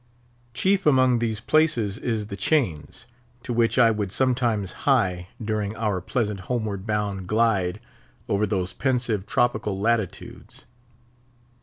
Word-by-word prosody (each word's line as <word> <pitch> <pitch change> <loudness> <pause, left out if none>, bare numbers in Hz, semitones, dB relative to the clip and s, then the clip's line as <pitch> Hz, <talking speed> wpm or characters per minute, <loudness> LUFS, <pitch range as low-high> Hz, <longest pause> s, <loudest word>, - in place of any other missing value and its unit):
Chief 195 +4 +2
among 130 -4 +4
these 110 -2 -1
places 115 -7 +1
is 110 -3 -2
the 100 - -6
chains, 100 - -1 0.4
to 120 - -3
which 115 -1 +2
I 115 -2 +6
would 105 -3 -2
sometimes 120 -6 0 0.2
hie 90 -9 +2
during 105 -2 -2
our 105 -5 -1
pleasant 105 -1 -2
homeward 105 -1 -3
bound 100 -3 -2
glide 105 -4 +1 0.5
over 100 +1 +1
those 95 -2 -2
pensive 120 -6 0
tropical 110 -5 0
latitudes. 110 -2 -3
110 Hz, 125 wpm, -24 LUFS, 100-120 Hz, 0.5 s, I